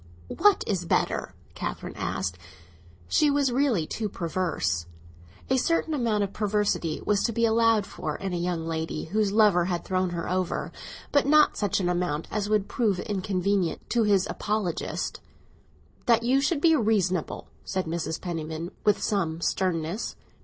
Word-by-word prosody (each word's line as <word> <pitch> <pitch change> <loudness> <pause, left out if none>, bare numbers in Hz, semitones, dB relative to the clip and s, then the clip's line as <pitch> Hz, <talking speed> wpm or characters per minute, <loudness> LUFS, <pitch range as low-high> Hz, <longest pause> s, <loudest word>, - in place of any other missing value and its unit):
"What 410 +2 +4
is 185 -4 -1
better?" - - 0 0.2
Catherine - - -5
asked. 90 -1 -3 0.7
She 300 - +3
was 280 -2 +2
really 245 - +2
too 215 +6 -3
perverse. 165 - -1 0.6
A 260 - +2
certain 320 +4 +1
amount 230 -7 +1
of 200 0 -4
perversity 205 -6 0
was 205 -1 +2
to 235 - +1
be 230 +1 +2
allowed 225 -2 +3
for 155 -5 -5
in 195 -2 -4
a - - 0
young 170 -1 -2
lady 160 -1 -3
whose 205 +3 0
lover 205 -5 +4
had 175 -1 -2
thrown 185 -1 0
her 170 -1 -4
over; 185 -1 -1 0.4
but 285 -2 +3
not 305 +1 +5
such 205 -2 0
an 180 - 0
amount 175 -3 -1
as 210 -1 -1
would 210 -2 +2
prove 210 -7 0
inconvenient 195 -2 -1
to 240 - +3
his 200 -3 +3
apologists. 205 -5 -2 0.9
"That 230 -1 +4
you 260 +3 +3
should 285 +1 +1
be 325 0 +5
reasonable," 200 - 0
said 185 -1 -2
Mrs. 160 0 -3
Penniman, 165 -1 -4
with 210 -1 +2
some 165 -6 0
sternness. 175 +2 -1
195 Hz, 155 wpm, -27 LUFS, 170-225 Hz, 0.9 s, not